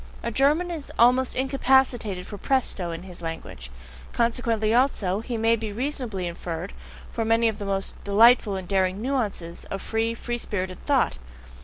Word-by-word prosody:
A 235 - -2
German 295 +9 +2
is 315 -4 -6
almost 250 +2 +4
incapacitated 260 -7 +1
for 205 - -8
PRESTO 245 -9 0
in 165 +1 -6
his 180 -2 -10
language; 165 - -7 0.4
consequently 230 -2 +1
also, 220 -6 +1
as 230 - -15
may 230 -1 +2
be 220 -2 -5
reasonably 240 -5 -2
inferred, 170 +1 -5 0.4
for 230 - -2
many 225 +1 +3
of 220 -1 -2
the 205 - -4
most 195 -1 -3
delightful 215 0 +5
and 190 -2 -5
daring 190 0 +1
NUANCES 215 -9 -3
of 195 - -5
free, 225 +3 -1
free 240 +1 -4
spirited 185 -4 -4
thought. 270 - +2
225 Hz, 160 wpm, -25 LUFS, 190-250 Hz, 0.4 s, delightful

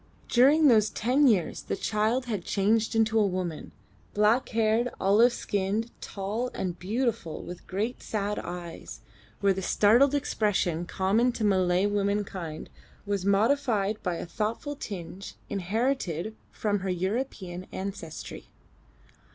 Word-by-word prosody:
During 285 +6 +5
those 215 -4 +5
ten 260 +6 +2
years 195 -9 +2
the - - -3
child 220 +5 0
had 210 -7 -3
changed 220 +4 +1
into 225 0 +3
a 210 - +4
woman, 180 -4 -4 0.4
black 215 +5 +3
haired, 225 +1 +2
olive 215 +5 +5
skinned, 205 +2 -2
tall, 210 +5 -3
and 180 -2 -3
beautiful, 220 -3 -2
with 175 - -9
great 210 +6 -2
sad 210 -1 -2
eyes, 175 -1 -7 0.4
where 200 -1 +4
the 190 - -4
startled 240 +9 +4
expression 185 - 0
common 210 +8 +2
to 230 - -4
Malay 185 -2 +3
womankind 200 -5 -2 0.3
was 200 -2 -2
modified 215 0 +2
by 180 -2 -1
a - - -5
thoughtful 220 - -3
tinge 190 -5 -7
inherited 210 - -1 0.2
from 205 -1 -1
her 190 0 -3
European 185 -1 -3
ancestry. 190 -5 -6
205 Hz, 125 wpm, -28 LUFS, 185-230 Hz, 0.4 s, During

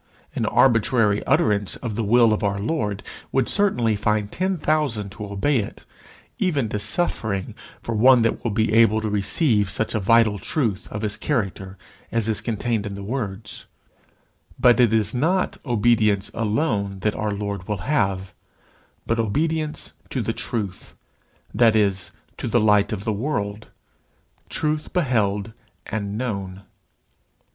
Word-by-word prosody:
An - - -1
arbitrary 115 -3 +3
utterance 105 -2 +2
of 115 -3 -5
the 115 +2 -2
will 115 +1 +5
of 105 - -2
our 100 -1 0
Lord 105 -4 -2 0.3
would 130 -2 +1
certainly 125 - +2
find 105 0 0
ten 185 +1 -1
thousand 145 -11 0
to 105 0 -7
obey 100 +8 0
it, 100 - -6 0.5
even 145 - +1
to 105 - -2
suffering, 105 - -1 0.3
for 115 - -3
one 120 +2 +6
that 115 - 0
will 115 - 0
be 110 0 0
able 115 -1 +5
to 110 - -2
receive 105 - +2
such 110 +3 -2
a 110 - +1
vital 110 0 +3
truth 115 - -2
of 105 +1 -5
his 105 -1 -2
character 95 -7 -2 0.3
as 115 -2 0
is 110 -2 -1
contained 115 -2 -2
in 100 - -6
the 100 - -7
words; 105 -3 -5 0.9
but 125 0 +5
it 120 -3 +5
is 110 -2 +2
not 170 +9 0
obedience 110 -4 +2
alone 105 -3 -1
that 105 +1 +1
our 105 - -2
Lord 100 -2 -4
will 105 -3 -3
have, 95 -10 0 0.7
but 115 0 0
obedience 155 +7 -1 0.2
to - - -2
the - - -1
truth, 105 -6 -5 0.6
that 115 -2 +4
is, 100 -3 +1 0.3
to - - -4
the 120 - +2
Light 105 -2 +3
of 100 -3 -3
the 110 - -1
World, 105 -3 -3 0.8
truth 150 0 -2
beheld 110 - 0 0.3
and 105 -1 -3
known. 100 -6 -4
110 Hz, 150 wpm, -23 LUFS, 100-120 Hz, 0.9 s, one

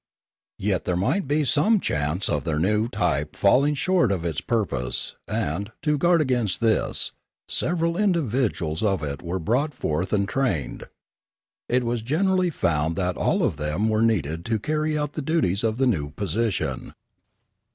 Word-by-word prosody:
Yet 95 -2 -1
there 90 - 0
might 135 - 0
be 150 +2 +2
some 155 - +3
chance 75 - -1
of 75 - 0
their 80 -3 -1
new 105 +7 +1
type 75 - -1
falling 140 +9 +3
short 175 - +2
of 90 -4 -2
its 80 -4 -2
purpose 100 - -2
and, 100 +9 -2
to 150 -1 +2
guard 170 +1 +4
against 125 -8 0
this, 115 -2 +1 0.4
several 170 0 0
individuals 130 - 0
of 95 -5 +1
it 70 -1 -4
were 90 +2 -3
brought 125 - 0
forth 85 +5 -2
and 100 -2 +1
trained. 100 - -1 0.8
It 125 +1 +2
was 120 -1 -1
generally 180 - +1
found 80 - 0
that 90 -2 -1
all - - +1
of - - 0
them 75 +9 -1
were 110 0 +1
needed 85 -8 +1
to 115 -1 0
carry 155 +6 -1
out 150 -1 -2
the 155 - -3
duties 135 - +1
of 110 0 0
the 135 - +2
new 80 - 0
position. 100 +6 -2
110 Hz, 160 wpm, -24 LUFS, -, 0.8 s, guard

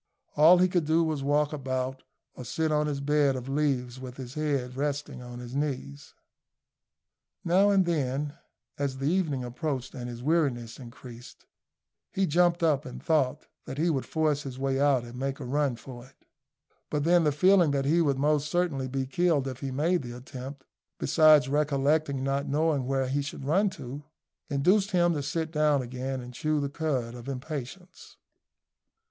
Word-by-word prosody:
All 160 +4 +7
he 180 +1 +4
could 175 -3 0
do 160 +2 +3
was 155 -2 -1
to 135 - -4
walk 150 +1 +2
about 130 -2 -3 0.3
or 125 - -9
sit 155 +6 -1
on 150 0 +2
his 145 -2 -2
bed 145 -1 +2
of 130 0 -6
leaves 135 -3 -1
with 130 -1 -9
his 130 -2 -8
head 140 -5 -2
resting 145 -1 -3
on 120 0 -9
his 120 0 -8
knees. 140 0 -4 1.3
Now 190 +4 +4
and 195 -2 +4
then, 145 -3 -1 0.4
as 140 -2 -2
the 135 - -4
evening 155 -5 0
approached 130 +1 -4
and 125 -1 -6
his 120 0 -8
weariness 135 -7 0
increased, 120 -1 -12 0.7
he 195 - +1
jumped 175 +1 +2
up 150 -3 +2
and 130 - -8
thought 150 -6 0 0.2
that 135 - -7
he 165 +3 +2
would 135 -4 -2
force 155 -2 +1
his 135 -3 -7
way 135 0 -1
out 140 -3 +3
and 120 +1 -9
make 135 +1 -3
a - - -6
run 140 0 0
for 120 +1 -11
it: 135 - -27 0.6
but 150 -1 -1
then 175 +1 +4
the 150 - +3
feeling 180 +3 +4
that 140 -1 0
he 165 +4 +3
would 140 -4 +1
most 150 +1 +1
certainly 160 -6 0
be 135 +1 -2
killed 150 -1 +1
if 130 -1 -6
he 135 - -4
made 160 +7 +1
the 120 -1 -7
attempt, 135 +2 -9 0.3
besides 155 -4 +5
recollecting 145 0 +1
not 135 +1 -1
knowing 145 -2 +1
where 135 -1 0
he 140 +3 0
should 140 -1 -6
run 195 +8 +3
to, 135 -4 -8 0.5
induced 185 +8 +2
him 175 -3 +3
to 150 - -2
sit 160 +3 -3
down 150 -3 +2
again 130 +2 -4
and 125 0 -10
chew 155 +4 0
the 140 -1 -2
cud 140 -6 -2
of 120 +2 -8
impatience. 150 +6 -7
140 Hz, 180 wpm, -28 LUFS, 130-155 Hz, 1.3 s, All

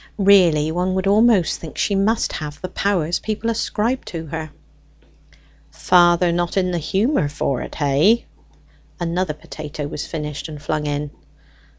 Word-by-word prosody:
Really, 180 -7 +4
one 180 +2 -1
would 190 0 -1
almost 205 -2 +3
think 160 - -9
she 205 - 0
must 210 +4 +1
have 150 -1 -6
the 185 - -6
powers 180 -4 0
people 220 +1 -2
ascribed 230 +3 -1
to 165 -2 -5
her. 160 +1 -5 1.2
"Father 175 - +4
not 175 +2 -1
in 185 -1 +1
the 175 - -1
humour 195 - +1
for't, 140 -3 -3
hey?" 155 +11 +3 0.7
Another 175 -2 -1
potato 150 -1 -7
was 145 0 -5
finished 150 -1 -5
and 150 -1 -8
flung 150 +1 -2
in. 145 0 -3
175 Hz, 145 wpm, -20 LUFS, 150-195 Hz, 1.2 s, Really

